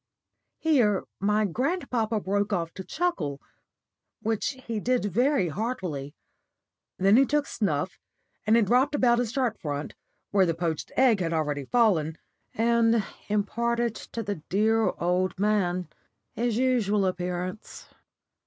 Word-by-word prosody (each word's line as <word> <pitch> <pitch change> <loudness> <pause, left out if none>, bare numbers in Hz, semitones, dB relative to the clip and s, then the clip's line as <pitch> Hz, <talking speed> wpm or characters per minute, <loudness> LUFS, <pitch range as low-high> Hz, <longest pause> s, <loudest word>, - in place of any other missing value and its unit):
'" - - -55
Here 245 - +2 0.2
my 210 +2 +2
grandpapa 235 - -1
broke 205 +1 -1
off 170 -4 -1
to 190 - -7
chuckle, 185 - -2 0.8
which 225 +3 -1
he 225 -2 -2
did 250 +1 0
very 230 - +2
heartily. 165 - -4 0.8
Then 195 +4 +5
he 270 - +7
took 295 +2 +1
snuff, 185 - -2 0.5
and 220 +2 +5
it 230 - +4
dropped 255 +7 +3
about 240 -3 +3
his 240 -3 -1
shirt 245 -4 -1
front, 145 -1 -4 0.4
where 195 -2 +4
the 165 - 0
poached 165 -2 -3
egg 250 -5 +5
had 170 -2 -1
already 145 -3 -1
fallen, 165 - +2 0.4
and 230 -1 +3 0.2
imparted 235 +3 0
to 230 - -6
the 200 -6 -4
dear 220 +3 +3
old 180 +2 0
man 185 -3 +1 0.5
his 235 -1 -1
usual 225 -6 +2
appearance. 180 +2 -4
210 Hz, 135 wpm, -27 LUFS, 180-235 Hz, 0.8 s, he